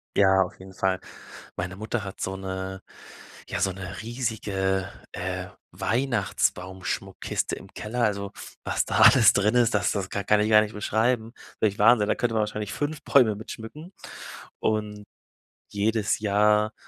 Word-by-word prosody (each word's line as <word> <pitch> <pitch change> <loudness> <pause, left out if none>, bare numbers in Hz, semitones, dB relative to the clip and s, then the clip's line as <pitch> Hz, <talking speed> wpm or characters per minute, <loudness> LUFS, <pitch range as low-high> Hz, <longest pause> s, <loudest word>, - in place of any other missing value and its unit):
Ja, 95 -1 +5
auf 95 - -9
jeden 95 0 -12
Fall. 95 -1 0 0.6
Meine 90 +1 -4
Mutter 110 +1 -3
hat 95 - -8
so 95 0 -2
'ne 95 0 -5 0.7
ja, - - -3
so 95 - +1
'ne 95 0 -7
riesige, 100 -5 -2 0.2
äh, 90 0 -4 0.3
Weihnachtsbaumschmuckkiste 95 -7 -1
im - - -11
Keller. 120 +3 -3
Also, 100 -2 -1 0.3
was - - 0
da - - 0
alles - - +8
drin 105 +3 +2
ist, 120 -3 +3
das 95 -3 +2
das 95 -2 -3
ka 100 - -2
kann 105 0 +4
ich 105 - +1
gar 105 -1 +8
nicht 105 0 -5
beschreiben. 110 +2 0 0.3
Wirklich 105 -2 +1
Wahnsinn. 105 0 +5
Da - - +3
könnte 120 -2 -1
man 110 - +2
wahrscheinlich 105 -1 -3
5 145 +1 -3
Bäume 115 -7 +4
mit 110 - -9
schmücken 150 - -9 0.7
und 105 -1 -1 0.7
jedes 105 +1 0
Jahr 105 +1 +3
105 Hz, 155 wpm, -26 LUFS, 95-110 Hz, 0.7 s, alles